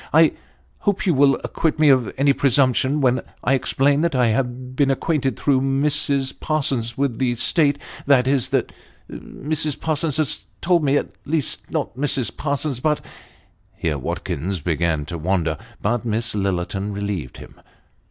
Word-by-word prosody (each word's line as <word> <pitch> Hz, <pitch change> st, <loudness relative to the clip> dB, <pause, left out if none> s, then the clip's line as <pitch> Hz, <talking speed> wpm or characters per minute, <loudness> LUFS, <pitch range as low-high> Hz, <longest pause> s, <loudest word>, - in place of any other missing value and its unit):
I -, -, +6 dB, 0.5 s
hope 205 Hz, -2 st, 0 dB
you 180 Hz, -, +3 dB
will 135 Hz, -1 st, +4 dB
acquit 160 Hz, -1 st, -1 dB
me 155 Hz, -1 st, +5 dB
of 130 Hz, -4 st, +3 dB
any 140 Hz, +1 st, +4 dB
presumption 135 Hz, +1 st, +2 dB
when 130 Hz, -2 st, +2 dB, 0.2 s
I 135 Hz, -, +2 dB
explain 140 Hz, +2 st, +2 dB
that 170 Hz, -3 st, 0 dB
I 125 Hz, -2 st, +3 dB
have 125 Hz, +2 st, -2 dB
been 140 Hz, 0 st, +2 dB
acquainted 135 Hz, 0 st, 0 dB
through 135 Hz, -3 st, +2 dB
Mrs. 135 Hz, 0 st, +1 dB
Parsons, 135 Hz, -6 st, -1 dB
with 135 Hz, -4 st, -1 dB
the 125 Hz, -2 st, +1 dB
state 145 Hz, +4 st, +2 dB, 0.3 s
that 135 Hz, -3 st, +5 dB
is, 135 Hz, -3 st, +1 dB
that -, -, 0 dB, 0.4 s
Mrs. 150 Hz, 0 st, -3 dB
Parsons 155 Hz, -1 st, 0 dB
has 155 Hz, -3 st, 0 dB
told 170 Hz, -2 st, +2 dB
me 140 Hz, 0 st, +3 dB
at -, -, -2 dB, 0.2 s
least, 155 Hz, -1 st, -3 dB
not -, -, -3 dB
Mrs. 135 Hz, -2 st, 0 dB
Parsons, 140 Hz, -2 st, -1 dB
but 150 Hz, +2 st, 0 dB, 0.4 s
" -, -, -37 dB
Here 75 Hz, -3 st, -1 dB
Watkins 90 Hz, +7 st, -3 dB
began 80 Hz, -1 st, 0 dB
to 85 Hz, +2 st, -6 dB
wander, 85 Hz, -1 st, 0 dB, 0.3 s
but 115 Hz, +3 st, 0 dB
Miss 115 Hz, 0 st, -1 dB
Lillerton 95 Hz, 0 st, -2 dB
relieved 100 Hz, -10 st, -4 dB
him. -, -, -13 dB
130 Hz, 160 wpm, -21 LUFS, 110-145 Hz, 0.5 s, I